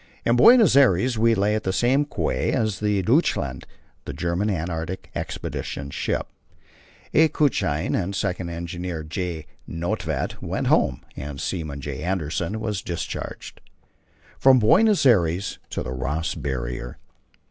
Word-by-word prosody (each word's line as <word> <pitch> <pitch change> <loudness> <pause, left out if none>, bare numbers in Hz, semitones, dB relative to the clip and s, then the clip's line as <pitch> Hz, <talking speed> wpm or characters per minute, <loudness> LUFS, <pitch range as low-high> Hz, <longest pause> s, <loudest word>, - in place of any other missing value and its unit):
In 120 - +3
Buenos 225 - +7
Aires 120 -2 +4
we 115 0 +4
lay 100 +1 +1
at 110 - 0
the 95 - -1
same 130 +8 +2
quay - - -1
as 110 -6 0
the 105 -2 +1
Deutschland, 100 - +1 0.4
the - - -5
German 90 +5 -1
Antarctic 85 0 -4
Expedition's 70 0 -5
ship. - - -1 0.9
A. 160 +1 +6
Kutschin 95 - 0
and 95 -1 0
the 100 - -4
second 90 -3 -2
engineer, 85 0 -5
J. 80 0 -4 0.2
Nödtvedt, 85 -4 -3
went - - -3
home, 60 - +2
and 70 0 -6
seaman 75 -3 -4
J. 70 -1 -5
Andersen 90 +3 -2
was 105 -3 -2
discharged. 85 -1 -6 0.8
From 135 -1 +6
Buenos 175 - +4
Aires 95 -5 +2
to - - -3
the - - -5
Ross 70 +6 -2
Barrier. - - -4
90 Hz, 135 wpm, -24 LUFS, 80-110 Hz, 0.9 s, Buenos